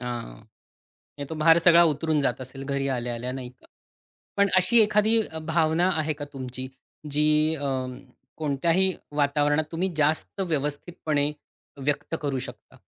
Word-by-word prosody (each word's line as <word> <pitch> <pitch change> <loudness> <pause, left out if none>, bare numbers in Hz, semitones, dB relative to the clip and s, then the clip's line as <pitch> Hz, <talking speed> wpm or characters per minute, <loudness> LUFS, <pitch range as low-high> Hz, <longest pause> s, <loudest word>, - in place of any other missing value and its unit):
आ, 125 - -6 1.1
नाही 140 -1 -6
तो - - -5
भार 165 +1 +5
सगळा 170 -1 +7
उतरून 155 0 +1
जात 130 -2 0
असेल 130 +1 -8
घरी 140 -1 -1
आल्या-आल्या 120 -1 -3
नाही 130 -1 -6
का? 125 - -24 0.7
पण 200 0 +4
अशी 185 +6 +5
एखादी 215 +1 +4
अ, 160 - -7
भावना 160 +2 +1
आहे 155 0 0
का 145 0 -6
तुमची, 130 -1 -6 0.4
जी 150 +2 +3
अ, 150 - -7 0.8
कोणत्याही 165 +6 +1 0.2
वातावरणात 145 +1 +2
तुम्ही 180 +4 -1
जास्त 155 +5 0
व्यवस्थितपणे 150 -2 -2 0.5
व्यक्त 145 +3 -2
करू 140 -2 -1
शकता? - - -10
150 Hz, 140 wpm, -25 LUFS, 140-165 Hz, 1.1 s, सगळा